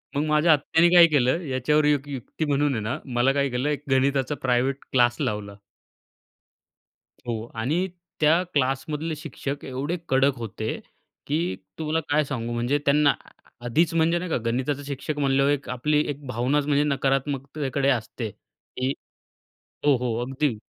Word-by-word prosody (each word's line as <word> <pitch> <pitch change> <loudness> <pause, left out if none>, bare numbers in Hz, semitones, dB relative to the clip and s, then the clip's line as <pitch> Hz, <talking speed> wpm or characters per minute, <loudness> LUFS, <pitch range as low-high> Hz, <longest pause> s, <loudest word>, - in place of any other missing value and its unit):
मग 145 - +1
माझ्या 155 +2 +4
आत्याने 160 +3 +3
काय 170 -1 +9
केलं, 145 +2 +2
याच्यावर 145 +3 +2
एक 145 -1 +2
युक्ती 140 +4 -4
म्हणून 145 -1 +1
आहे 110 - -2
ना, 110 +4 -2 0.2
मला 120 +3 +3
काय 140 -1 +1
केलं 125 +4 -1
एक 145 -1 -2
गणिताचा 135 +1 +2
प्रायव्हेट 130 +1 +1 0.2
क्लास 120 -2 +3
लावला. 100 -1 -3 1.7
हो 115 -1 -3
आणि 155 +12 0 0.3
त्या 160 +3 +4
क्लासमधले 150 +4 -1
शिक्षक 145 -2 -6
एवढे 140 +6 -3
कडक 135 +1 +3
होते 110 -1 -4 0.5
की 155 - 0 0.2
तुम्हाला 160 +1 0
काय 150 +1 +3
सांगू, 120 -4 -4
म्हणजे 120 +5 +1
त्यांना 145 0 +4 0.5
आधीच 160 +8 +2
म्हणजे, 165 +1 +3
नाही 180 0 -5
का, - - +2
गणिताचा 130 +4 -1
शिक्षक 145 +2 -4
म्हणल्यावर 135 0 +3
एक 140 -1 -2
आपली 150 +4 +1
एक 145 0 -5
भावनाच 130 +4 0
म्हणजे 145 0 +3
नकारात्मकतेकडे 140 0 0
असते, 115 -2 -2
की 130 +7 -6 1.0
हो, 140 -3 +5
हो, 120 -2 -2
अगदी. 135 -2 -1
140 Hz, 150 wpm, -25 LUFS, 125-150 Hz, 1.7 s, काय